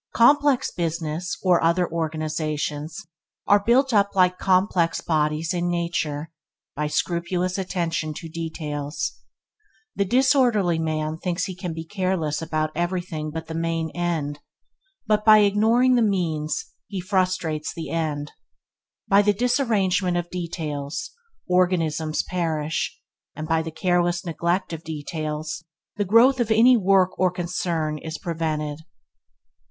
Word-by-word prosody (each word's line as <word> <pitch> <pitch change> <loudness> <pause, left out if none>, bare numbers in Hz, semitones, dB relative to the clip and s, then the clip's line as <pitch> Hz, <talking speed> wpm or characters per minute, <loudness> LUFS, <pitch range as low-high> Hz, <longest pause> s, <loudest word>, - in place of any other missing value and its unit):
Complex 285 +2 +4
business 170 0 -3
or 180 -3 +4
other 170 +2 +3
organizations 155 -1 -3 0.4
are 205 0 +4
built 255 +4 +3
up 200 -1 +3
like 180 -1 +3
complex 185 -3 +2
bodies 155 +1 0
in 175 0 -1
nature, 165 -3 -2 0.4
by 150 +1 -1
scrupulous 175 +4 -1
attention 170 -4 -2
to 165 - -7
details. 155 -2 -4 0.8
The 200 - +1
disorderly 240 - +3
man 155 0 -2
thinks 180 0 -1
he 185 - -6
can 180 -3 -5
be 160 0 -6
careless 185 -5 -1
about 155 -1 -1
every 175 +2 -1
thing 155 -3 -5
but 160 +1 -5
the 160 - -7
main 165 -1 -2
end, 160 -4 -2 0.7
but 210 -1 +2
by 215 -1 +8
ignoring 220 +5 +4
the 245 - +4
means 165 -8 0 0.2
he 195 - -5
frustrates 185 -5 -1
the 165 - -6
end. 150 -3 -2 0.8
By 200 +1 +6
the 205 0 +3
disarrangement 205 -7 +1
of 175 0 -3
details, 165 - -4 0.4
organisms 165 -4 +1
perish, 160 -3 -2 0.4
and 155 - -5
by 160 0 +2
the 160 - -5
careless 175 +2 0
neglect 170 +2 -1
of 165 0 -6
details, 155 +1 -4 0.3
the 205 - 0
growth 240 +7 +5
of 235 -2 0
any 230 +3 +6
work 195 -3 +3
or 185 0 +4
concern 170 -3 -2
is 160 +1 -6
prevented. 155 -3 -3
170 Hz, 130 wpm, -24 LUFS, 155-190 Hz, 0.8 s, by